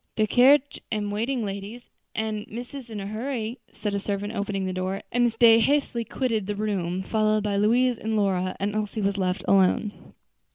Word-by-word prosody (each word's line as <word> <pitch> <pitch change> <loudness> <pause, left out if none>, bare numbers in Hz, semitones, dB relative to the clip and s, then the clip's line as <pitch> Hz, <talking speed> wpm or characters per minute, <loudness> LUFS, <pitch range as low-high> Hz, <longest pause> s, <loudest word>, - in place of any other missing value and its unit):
"De 215 - +3
carriage 265 +5 +4
am 210 -2 -1
waiting, 230 +3 -1
ladies, 200 +4 -7 0.2
an' 215 -1 -2
missus 245 +2 -8
in 215 -2 -5
a 195 - -5
hurry," 230 +2 -4
said 210 -2 -4
a 200 - 0
servant, 205 +1 -3
opening 200 -2 -2
the 185 - -2
door; 185 +2 -3
and 245 0 +3
Miss 230 -2 0
Day 230 -1 +7
hastily 245 -1 +1
quitted 225 -5 -2
the 205 - -2
room, 190 -3 -2
followed 215 0 +1
by 205 -1 -1
Louise 235 +4 +3
and 220 0 -2
Lora; 185 -2 0
and 200 +1 -1
Elsie 215 0 -2
was 200 0 0
left 185 0 -1
alone. 195 +2 +1
215 Hz, 190 wpm, -25 LUFS, 200-230 Hz, 0.2 s, Day